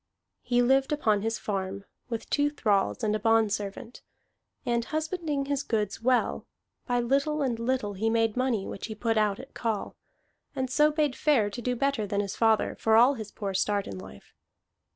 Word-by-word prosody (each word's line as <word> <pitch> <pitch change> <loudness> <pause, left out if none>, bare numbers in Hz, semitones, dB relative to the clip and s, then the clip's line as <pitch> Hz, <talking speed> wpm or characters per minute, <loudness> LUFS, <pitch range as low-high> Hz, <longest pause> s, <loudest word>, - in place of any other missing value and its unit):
He 245 0 +2
lived 270 +3 +3
upon 215 -9 +2
his 225 +1 -1
farm, 195 -1 -4 0.2
with 230 -2 -4
two 290 0 +3
thralls 215 -8 0
and 215 -1 +1
a - - -1
bondservant; 220 +1 0 0.6
and 235 -1 +1
husbanding 310 0 -2
his 285 0 -1
goods 215 -6 -2
well, 250 +1 +1 0.4
by 245 -1 +1
little 280 +5 +1
and 240 -4 -1
little 230 -3 -1
he 215 +4 0
made 225 -1 +1
money 250 -6 0
which 195 - -6
he 220 - -6
put 225 +1 0
out 210 0 +1
at 265 - -11
call, 225 -3 -3 0.6
and 260 -1 -2
so 300 +3 +4
bade 300 -3 0
fair 240 -9 +2
to 220 - -6
do 250 +1 -1
better 260 -4 0
than 200 +1 -1
his 200 -2 -2
father, 225 -1 +2
for 220 0 +3
all 245 +5 +6
his 220 -5 -7
poor 200 -3 -4
start 200 +1 0
in 95 - -7
life. 95 +1 -13
230 Hz, 185 wpm, -28 LUFS, 210-265 Hz, 0.6 s, all